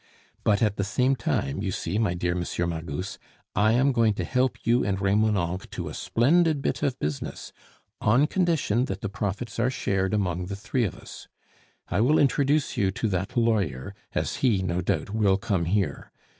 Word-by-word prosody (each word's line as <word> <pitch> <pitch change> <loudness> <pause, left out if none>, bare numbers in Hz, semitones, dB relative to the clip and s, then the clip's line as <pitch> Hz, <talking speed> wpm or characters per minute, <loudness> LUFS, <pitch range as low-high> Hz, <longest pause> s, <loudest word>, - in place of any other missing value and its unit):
But 105 +2 +3
at 105 -2 +1
the 100 - 0
same 125 +7 +1
time, 95 - -1
you 100 -2 -1
see 95 +3 -2
my 100 -6 +1
dear 90 0 -1
M. 90 - -1 0.3
Magus, 80 +3 -5 0.4
I 110 +3 +4
am 135 +4 +3
going 115 -4 +2
to - - -2
help 130 -1 0
you 120 +2 +3
and 100 -1 0
Remonencq 100 -3 +1
to - - -5
a - - -8
splendid 155 +5 +2
bit - - -1
of 140 -4 0
business 75 -2 -4 0.5
on 120 +7 +4
condition 155 - +1
that 95 -3 -5
the 105 - -3
profits 105 +2 -4
are 120 +2 +3
shared 95 -5 0
among 90 -3 -1
the 100 - -4
three 110 +5 -1
of 100 - -3
us. - - -11 0.6
I - - 0
will 145 +7 +4
introduce 140 +2 +2
you 95 - +2
to 105 +4 -2
that 95 +6 -2
lawyer, 100 - 0 0.2
as - - -1
he, 110 -8 +2
no 90 -1 -1
doubt, 90 0 -1
will 100 -3 +3
come 95 -5 -1
here. 90 -4 -1
105 Hz, 185 wpm, -26 LUFS, 95-120 Hz, 0.6 s, I